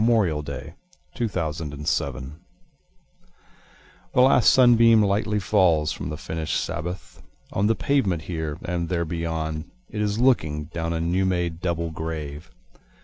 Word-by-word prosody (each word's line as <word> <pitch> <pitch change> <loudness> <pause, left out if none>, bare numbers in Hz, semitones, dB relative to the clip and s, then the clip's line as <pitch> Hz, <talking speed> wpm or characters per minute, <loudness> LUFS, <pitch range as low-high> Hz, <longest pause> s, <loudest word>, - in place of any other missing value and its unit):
Dirge - - +3 0.2
for 75 +1 -5 0.4
Two 120 - -1
Veterans 75 -6 -2
The 65 +1 -6 1.8
last 125 -1 +6
sunbeam 115 -3 +6
Lightly 105 +1 +1
falls 90 -7 +3
from - - -5
the 75 - -4
finishâd 80 +2 -3
Sabbath, 90 +3 -5 0.3
On 100 +2 +2
the 115 - +3
pavement 100 - 0
here, 80 -3 -4
and 85 -1 -2
there 85 -2 0
beyond 80 -1 -3 0.2
it 105 - -3
is 105 0 0
looking, 80 - +2
Down 85 -1 -2
a 80 - -1
new 85 +3 +1
made 90 -3 -1
double 85 -2 -2
grave. 80 0 -6
85 Hz, 135 wpm, -24 LUFS, 80-100 Hz, 1.8 s, last